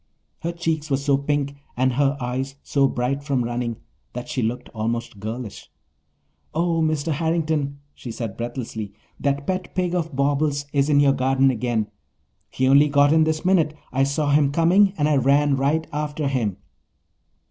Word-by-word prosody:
Her 170 - -2
cheeks 160 -3 -2
were 135 - +2
so 140 0 +2
pink 140 0 -1 0.2
and 130 0 +2
her 140 +2 +1
eyes 130 +2 -3
so 140 -1 +2
bright 135 +3 -2
from 135 -4 0
running 120 0 -2 0.4
that 125 0 -6
she 130 - -1
looked 120 +2 -2
almost 115 -1 -3
girlish. 110 +1 -6 0.9
"Oh, 165 0 +1
Mr. 155 0 0
Harrington," 155 -2 0 0.2
she 125 - -9
said 115 -3 -5
breathlessly, 115 -3 -5 0.3
"that 140 0 -1
pet 185 -1 -3
pig 180 -1 0
of 165 -4 -2
Bobbles' 145 +1 +1
is 140 +1 +2
in 145 -1 +4
your 140 -1 +5
garden 135 0 +3
again. 120 -2 -1 0.6
He 130 - 0
only 140 +2 +6
got 145 +1 +4
in 160 -1 +5
this 155 +2 -1
minute. 165 -5 +3 0.2
I 135 +1 +2
saw 145 +1 0
him 145 -1 +4
coming 180 +6 +4
and 150 -1 +2
I 150 -2 +3
ran 140 +2 +3
right 145 +4 +1
after 150 0 -2
him." 115 -8 -1
140 Hz, 170 wpm, -23 LUFS, 125-155 Hz, 0.9 s, only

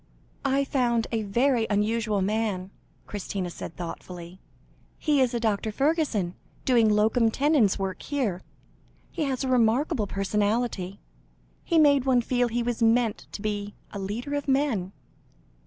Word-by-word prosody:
"I 275 +1 +2
found 240 -4 +1
a 225 -2 0
very 235 +3 +2
unusual 210 -1 +1
man," 200 -2 -1 0.3
Christina 195 -3 -4
said 165 - -8
thoughtfully; 175 +1 -8 0.6
"he 295 -3 +2
is 245 -2 +2
a - - +1
Dr. 220 -1 0
Fergusson, 270 - 0 0.3
doing 235 -4 +4
locum 220 +2 +3
tenens 270 -4 +3
work 195 -1 -3
here. 240 -11 -2 0.7
He 320 - -2
has 265 -1 -1
a - - -1
remarkable 245 -1 +2
personality; 205 0 -1 0.6
he 335 - +1
made 285 -4 +5
one 255 -2 +4
feel 245 +1 +1
he 240 +1 -1
was 240 -1 -2
meant 230 -1 +2
to 200 - -7
be 205 -1 -3 0.2
a 200 - -6
leader 220 +9 -4
of 285 0 -2
men." 265 -9 +1
225 Hz, 140 wpm, -26 LUFS, 205-260 Hz, 0.7 s, made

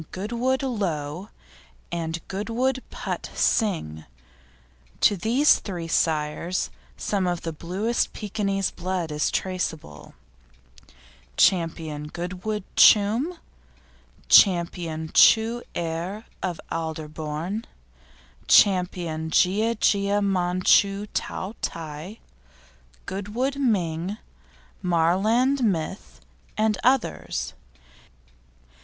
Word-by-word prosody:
Goodwood 240 +7 -1
Lo 185 - -3 0.6
and 165 -1 -4
Goodwood 235 +6 -1
Put - - -5
Sing. 160 - 0 1.0
To 205 - +5
these 235 - +3
three 175 -5 -5
sires, 160 +2 0 0.3
some 195 -3 -1
of 175 -1 -1
the 165 - -3
bluest 190 +9 -1
Pekinese 195 -2 -2
blood 180 -2 -3
is 150 0 0
traceable, 155 - -4 1.2
vide 160 -4 +1
Ch. - - -21
Goodwood 185 +4 -4
Chum, 230 - +5 0.9
Ch. - - +9 0.7
Chu 230 +2 +5
Erh 170 +5 -3 0.2
of 180 -3 -3
Alderbourne, 160 +4 -4 0.8
Ch. - - +9 0.7
Gia 210 +8 +2
Gia, 200 -1 +2
Manchu 195 +1 +2
Tao 190 +3 -3
Tai, 160 +5 -5 0.9
Goodwood 225 +8 -3
Ming, 190 - 0 0.6
Marland 205 +11 +2
Myth, 190 -2 -2 0.4
and 215 -1 +1
others. 260 0 0
190 Hz, 80 wpm, -25 LUFS, 165-215 Hz, 1.2 s, Ch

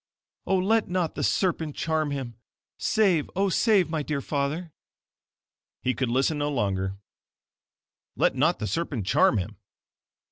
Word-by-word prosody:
Oh 190 - +3
let 215 +3 +2
not 180 -3 0
the - - -4
SERPENT 165 -5 0
CHARM 160 -2 0
HIM! 135 -5 -4 0.4
Save, 190 -9 +2
oh, 195 +1 +2
save 200 -1 +3
my 160 -2 0
dear 150 -1 -2
father!" 145 +5 -2 1.1
He 130 - +1
could 130 -2 -1
listen 135 +5 +1
no 145 0 0
longer, 95 -7 -1 1.2
"_Let - - +3
not 155 +7 +2
the 110 - -3
serpent 140 - -2
charm 105 - +4
him! 100 +2 -4
150 Hz, 140 wpm, -26 LUFS, 130-175 Hz, 1.2 s, charm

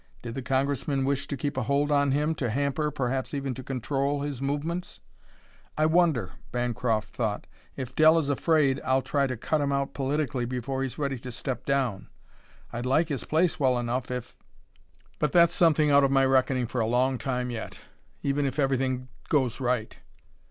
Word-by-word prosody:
Did 115 -1 -5
the 135 - -4
Congressman 135 +1 0
wish 140 0 -1
to 140 - -4
keep 145 -2 -3
a - - +1
hold 140 +5 +1
on 145 -1 +3
him 150 +4 +1
to 135 -6 -2
hamper, 140 +5 0
perhaps 135 -1 -2
even 135 -2 -2
to 130 - -7
control, 135 +2 -1
his 140 -3 -4
movements? 150 +6 -3 0.8
"I 155 - +3
wonder," 160 - +2 0.2
Bancroft 120 -3 -1
thought, 110 -3 -2 0.3
"if 130 -1 -6
Dell 155 +3 +6
is 160 -4 +1
afraid 145 -1 +2
I'll 130 0 +2
try 140 -2 +1
to 130 -2 -4
cut 150 +6 0
him 140 -1 0
out 140 0 -1
politically 135 -2 -1
before 130 +2 -3
he's 135 -2 -3
ready 140 -3 -2
to 125 +1 -7
step 125 +1 -5
down. 130 -8 0 0.7
I'd 120 +1 -3
like 155 +6 +2
his 140 -5 -3
place 160 +2 +1
well 130 -3 +3
enough 120 +1 -2
if 125 -2 -5 0.8
but 150 -2 0
that's 170 -1 +6
something 155 -3 +4
out 140 0 +6
of 135 - +4
my 135 0 +4
reckoning 130 -1 +2
for 125 +1 -2
a 110 - +1
long 125 +2 +1
time 125 -2 -2
yet, 115 -2 -6 0.5
even 140 0 +1
if 135 - -4
everything 130 -2 0 0.2
goes 130 -6 +1
right." 125 -3 -1
135 Hz, 185 wpm, -27 LUFS, 125-145 Hz, 0.8 s, Dell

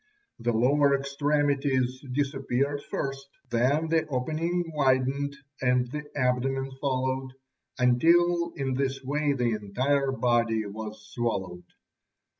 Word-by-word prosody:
The 120 +1 0
lower 140 +4 +3
extremities 140 -2 0
disappeared 140 0 -1
first, 135 0 -4 0.2
then 135 +7 +2
the 160 -1 +2
opening 160 +6 -1
widened, 140 0 +1 0.2
and 125 -1 +2
the 150 - -3 0.2
abdomen 135 +1 0
followed, 130 -1 -1 0.4
until 170 +7 +3
in 135 -4 -2
this 135 0 -1
way 145 +2 0
the 125 -3 0
entire 130 +7 0
body 120 -4 +1
was 105 +1 -7
swallowed. 95 -7 -2
135 Hz, 105 wpm, -27 LUFS, 125-145 Hz, 0.4 s, lower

